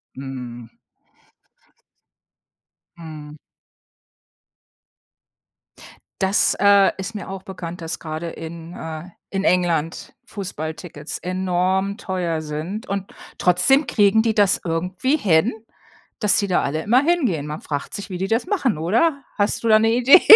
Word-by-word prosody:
Mhm. 125 -3 -8 2.2
Mhm. 155 -2 -9 2.8
Das, 190 +2 +3
äh, 200 -1 +6
ist 190 +3 -5
mir 210 - -6
auch 190 -1 -6
bekannt, 180 -3 -7
dass 165 +1 -4
gerade 160 +1 -5
in 165 +1 -8
äh, 160 +1 -7 0.2
in 195 0 -2
England 170 -4 0
Fußballtickets 160 -5 -6
enorm 185 +2 0
teuer 175 -6 -2
sind 155 +9 -5
und 200 -1 -4 0.2
trotzdem 180 - +4
kriegen 220 -2 +4
die 225 -1 +2
das 205 -2 +3
irgendwie 180 - 0
hin, 195 - +3 0.7
dass 210 -2 +4
die 200 - +1
da 180 - +2
alle 155 +3 -1
immer 245 +5 +4
hingehen. 265 - +1
Man 150 +1 -5
fragt 145 -2 -4
sich, 200 0 -5
wie 185 - -4
die 190 +2 -2
das 225 - 0
machen 310 - +1
oder? 265 - +1
Hast 205 +2 +1
du - - 0
da 215 - +7
eine 225 +1 +3
Idee? 250 +9 +7
185 Hz, 130 wpm, -22 LUFS, 160-210 Hz, 2.8 s, da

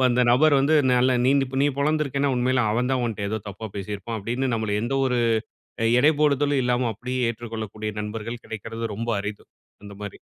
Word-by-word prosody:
அப்ப 130 - +4
அந்த 125 +1 +3
நபர் 145 +3 +5
வந்து, 150 +3 +3 0.2
"நல்லா 125 +1 +3
நீந் 140 +1 +4 0.2
நீ - - +4
பொளந்திருக்கேனா 140 -1 +1
உண்மையில 125 -1 +2
அவன் 125 +3 0
தான் 130 -2 +1
உன்ட்ட 100 -3 -3
ஏதோ 110 -1 -2
தப்பா 105 +3 -7
பேசியிருப்பான்!" 105 +3 -5
அப்டீன்னு, 125 +4 -1
நம்மளை 105 -2 -1
எந்த 120 +3 -1
ஒரு 125 -1 +1 0.6
அ - - +2 0.2
எடைபோடுதலும் 145 -2 +3
இல்லாம 125 0 +1
அப்படியே 125 +4 -4
ஏற்றுக்கொள்ளக்கூடிய 110 -2 -5
நண்பர்கள் 115 +3 -5
கிடைக்கிறது 115 +1 -5
ரொம்ப 115 +3 -4
அரிது 105 0 -6 0.4
அந்த 100 - -9
மாரி. 100 - -7
120 Hz, 175 wpm, -24 LUFS, 110-135 Hz, 0.6 s, நபர்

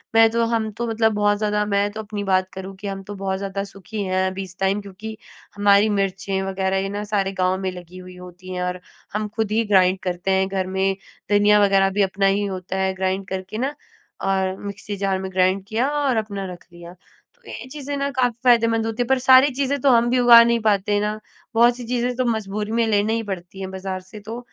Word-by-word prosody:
मैं 225 0 +7
तो 230 0 +1
हम 230 -1 0
तो 235 +3 -4
मतलब 225 -1 +1
बहुत 205 0 +2
ज़्यादा 210 0 0
मैं 200 0 +1
तो 215 - -8
अपनी 210 -1 -5
बात 185 -1 +1
करूँ 190 0 -7
कि 205 - -6
हम 195 0 -4
तो 205 +1 -8
बहुत 190 -1 -1
ज़्यादा 195 0 -4
सुखी 200 +1 -7
हैं 185 0 0
अभी 190 +1 -5
इस 185 -1 -12
टाइम 195 +2 +1
क्योंकि 210 +2 -9 0.4
हमारी 205 +1 +4
मिर्चें 195 -1 -1
वगैरह, 190 0 -1
ये 195 0 -1
ना, 205 +1 -4
सारे 205 -2 -1
गाँव 185 -1 0
में 190 -1 -2
लगी 180 0 -11
हुई 185 0 -11
होती 180 +1 -11
हैं 180 - -3
और 180 0 -3 0.3
हम 210 +1 -1
खुद 220 -2 -1
ही 225 +2 +2
ग्राइंड 190 -2 +3
करते 180 +1 -2
हैं 190 0 +2
घर 190 -1 -2
में। 190 +1 0 0.4
धनिया 205 0 +5
वगैरह 195 -1 +4
भी - - +4
अपना 195 +1 0
ही 200 +1 +2
होता 190 -1 -4
है, 190 0 +1
ग्राइंड 190 +1 -2
करके 190 +2 -5
ना, 260 +4 0 0.5
अ, - - -3
और 190 -1 0
मिक्सी 200 +1 -6
जार 195 -1 0
में 190 0 -5
ग्राइंड 185 +1 +2
किया 235 +5 0
और 260 -4 +1
अपना 200 -3 -3
रख 175 - -12
दिया। 175 0 -12 0.4
तो 485 - -34
ये 235 - -8
चीज़ें 285 -1 -5
ना 280 0 -1
काफ़ी 245 -3 0
फायदेमंद 230 -2 +3
होती 225 +2 -1
हैं। - - -8
पर 265 +1 +3
सारी 260 +2 +6
चीज़ें 280 +1 0
तो 275 - +4
हम 240 0 +4
भी 250 +1 +2
उगा 240 -1 +9
नहीं 235 0 +2
पाते 205 -1 +2
ना। 210 +1 -2 0.4
बहुत-सी 240 +1 +3
चीज़ें 245 0 -1
तो 255 +1 0
मजबूरी 215 -2 -2
में 230 0 +2
लेने 210 0 +2
ही 230 0 -1
पड़ती 190 -2 -7
हैं 190 -1 -5
बाज़ार 190 0 -5
से, 190 +4 -12
तो 220 +3 -7
200 Hz, 230 wpm, -22 LUFS, 190-225 Hz, 0.5 s, उगा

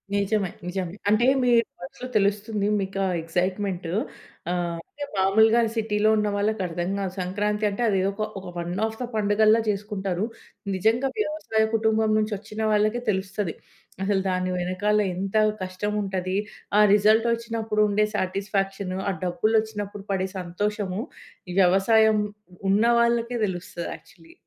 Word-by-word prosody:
నిజమే. 200 -1 +1 0.2
నిజమే. 180 -1 -3
అంటే, 215 +3 +4 0.2
మీ 245 - +3 0.3
మనసులో 180 +8 -8
తెలుస్తుంది, 205 +1 0
మీకు 195 0 -3
ఆ - - 0
ఎక్సైట్‌మెంట్. 180 +2 -2 0.6
ఆహ్, 175 -1 -2
అంటే, 290 - -8
మాములుగా 220 +5 +4
సిటీ‌లో 215 -1 +1
ఉన్న 210 0 +1
వాళ్ళకి 210 0 0
అర్థం 175 +1 -3
గాదు. 190 -2 -3
సంక్రాంతి 210 +3 -1
అంటే 200 +4 -4
అదేదొక 195 +1 0 0.2
ఒక 190 - -12
వన్ 175 0 -3
ఆఫ్ 220 0 -5
ద - - -1
పండుగల్లా 215 +1 +4
చేసుకుంటారు. 200 -2 -2 0.5
నిజంగా 225 +8 +2
వ్యవసాయ 305 - 0
కుటుంబం 220 0 +2
నుంచి 215 0 -1
వచ్చిన 215 +1 -7
వాళ్ళకే 215 +3 +2
తెలుస్తది. 190 -2 -3 0.5
అసలు 195 0 +1
దాని 185 0 0
వెనకాల 185 +4 +1 0.2
ఎంత 195 +3 -2 0.2
కష్టం 185 +3 -3
ఉంటది, 190 -1 -2 0.4
ఆ - - +8
రిజల్టొచ్చినప్పుడు 225 +1 +2
ఉండే 210 +1 +3
సాటిస్ఫాక్షను, 195 -1 -2
ఆ - - +2
డబ్బులొచ్చినప్పుడు 205 +1 -1
పడే 190 -1 0
సంతోషము, 195 +2 -2 0.6
వ్యవసాయం 215 +4 +4 0.5
ఉన్న 200 +3 +4 0.2
వాళ్ళకే 235 +1 +1
తెలుస్తది 175 -1 -5
యాక్చల్లీ. 165 -1 -18
205 Hz, 130 wpm, -25 LUFS, 185-215 Hz, 0.6 s, ఆ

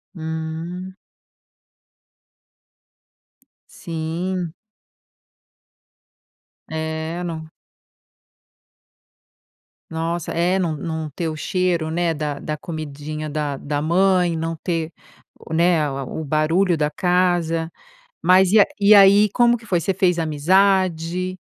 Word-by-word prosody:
Hum. 160 +3 -5 2.8
Sim. 170 +1 -4 2.2
É, 160 +2 -4
não 165 -2 -4 2.5
Nossa, 165 +1 -3
é, 175 +3 +1
não 170 -4 -1
não 160 0 -4
ter 160 +3 -3
o 155 - -5
cheiro, 170 -1 -1
né, 170 0 0
da 150 -2 -4
da 155 0 -4
comidinha 155 -1 -6
da 145 -2 -2
da 145 +1 -3
mãe. 180 +1 +2
Não 165 +1 -3
ter 165 0 -3 0.5
o, 160 - -9
né, 170 -1 +3
a 135 -2 -3
o 160 +4 -5
barulho 160 +4 +1
da 150 -1 +1
casa, 175 -2 0 0.5
mas 185 +1 +5
e 215 - +7
a - - +6
e 205 +1 +7
aí 200 +1 +7
como 240 +1 +3
que 225 - -15
foi? 175 -4 +1
Você 190 +3 -1
fez 180 -2 +2
amizade 185 +2 +1
165 Hz, 105 wpm, -21 LUFS, 160-185 Hz, 2.8 s, e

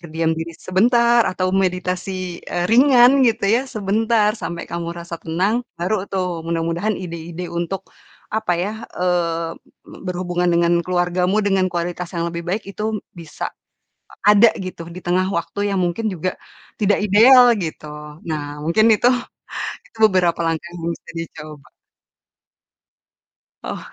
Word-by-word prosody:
berdiam 165 -1 -1
diri 165 0 -5
sebentar 235 +4 +3
atau 185 0 -1
meditasi, 185 -1 -1
eee, 175 0 -3
ringan 255 +1 +6
gitu 230 -5 +2
ya 235 +7 +2
sebentar 215 0 +1
sampai 170 -6 -5
kamu 170 0 -5
rasa 170 -1 -7
tenang 185 +8 0 0.2
baru 185 +3 -1
tuh 180 -3 -2
mudah-mudahan 170 +5 -1
ide-ide 170 0 -6
untuk 170 +3 -3 0.5
apa 220 -4 0
ya, 185 +5 -2 0.2
eee, 170 -2 0 0.3
be - - -13
berhubungan 180 0 -1
dengan 170 0 +3
keluargamu 180 +2 0
dengan 195 -2 +2
kualitas 175 0 -3
yang 170 - -1
lebih 170 0 -5
baik 200 +5 -1
itu 215 +2 -2 0.2
bisa 165 -4 -8 0.7
a - - -16 0.2
ada 215 +3 +7 0.2
gitu 170 -2 -7
di 175 +2 -8
tengah 185 +1 +2
waktu 205 +4 -2
yang 195 - 0
mungkin 215 +6 -1
juga 185 -1 -2 0.5
tidak 205 -1 +3
ideal 240 +4 +7
gitu. 160 -2 -5 0.4
Nah, 145 -2 -4
mungkin 170 +8 +3
itu, 240 - +2 0.8
itu - - -22
beberapa 185 -5 +2
langkah 165 +1 -2
yang 165 -1 -6
bisa - - -14
dicoba. 155 -3 -8 1.9
Oh. - - -6
180 Hz, 140 wpm, -20 LUFS, 170-205 Hz, 1.9 s, ada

